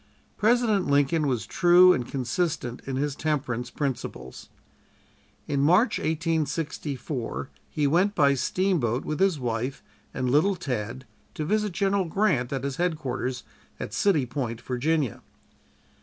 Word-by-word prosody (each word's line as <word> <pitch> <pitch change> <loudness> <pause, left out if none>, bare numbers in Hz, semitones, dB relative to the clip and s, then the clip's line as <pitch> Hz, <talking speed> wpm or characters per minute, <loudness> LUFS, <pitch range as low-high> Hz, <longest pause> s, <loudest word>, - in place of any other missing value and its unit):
President 220 -3 +2
Lincoln 145 +2 +2
was 120 -5 -1
true 180 - +6
and 125 -2 -2
consistent 130 -1 -2
in 135 - -2
his 140 +1 -1
temperance 130 -7 -2
principles. 125 - -5 1.0
In 140 - 0
March, 185 - +4
1864, 150 - -2 0.2
he 150 - -1
went 180 +8 +2
by 140 -1 +4
steamboat 135 - 0
with 155 - -3
his 190 -5 +2
wife 125 +2 -3 0.3
and 130 -1 -2
"Little 160 +8 +3
Tad," 130 - -4 0.3
to 155 - -3
visit 210 +2 0
General 195 0 +1
Grant 165 - +1
at 135 -1 -2
his 140 -1 -3
headquarters 130 -7 -2 0.4
at - - -6
City 165 -10 +2
Point, 120 -3 -4
Virginia. 135 +1 -1
145 Hz, 125 wpm, -26 LUFS, 130-175 Hz, 1.0 s, true